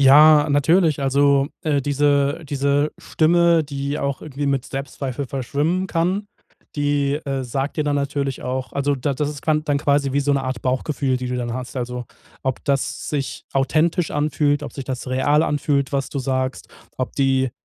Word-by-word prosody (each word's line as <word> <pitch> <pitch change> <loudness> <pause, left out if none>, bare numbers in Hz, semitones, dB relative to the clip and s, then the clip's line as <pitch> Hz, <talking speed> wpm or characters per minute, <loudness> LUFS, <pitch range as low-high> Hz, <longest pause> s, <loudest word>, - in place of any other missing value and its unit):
Ja, 150 +2 +7
natürlich, 155 +2 +3
also, 140 0 +3 0.2
äh, 145 -3 +1
diese 145 +2 +1
diese 140 +1 +1
Stimme, 170 0 +3
die 140 0 -3
auch 140 -1 -2
irgendwie 145 -1 -4
mit 135 -2 0
Selbstzweifel 135 -1 -5
verschwimmen 145 +8 -1
kann, 185 +4 0 0.5
die, 145 -1 +1
äh, 135 -2 -2
sagt 135 +3 -3
dir 150 - 0
dann 145 -1 +1
natürlich 140 -1 -2
auch 130 +1 -3
also 140 0 0
da 135 +2 -1
das 145 +2 -1
ist 145 -2 -9
kann-dann 150 -2 +1
quasi 140 -2 +1
wie 140 - +2
so 145 0 +1
'ne 140 -1 +1
Art 130 -3 -3
Bauchgefühl, 130 +1 0
die 125 0 -4
du 125 - -2
dann 120 -1 -3
hast. 125 0 -6
Also, 125 0 -3 0.4
ob 130 -1 -2
das 140 -2 -1
sich 140 -3 -3
authentisch 155 +5 +1
anfühlt, 145 -1 +1
ob - - -7
sich 135 - -6
das 130 -1 -5
real 145 +4 +2
anfühlt, 145 -3 0
was 135 -1 -1
du 140 - -4
sagst, 130 0 -2 0.3
ob 130 - -3
die 135 -2 +2
140 Hz, 175 wpm, -21 LUFS, 135-150 Hz, 0.5 s, Ja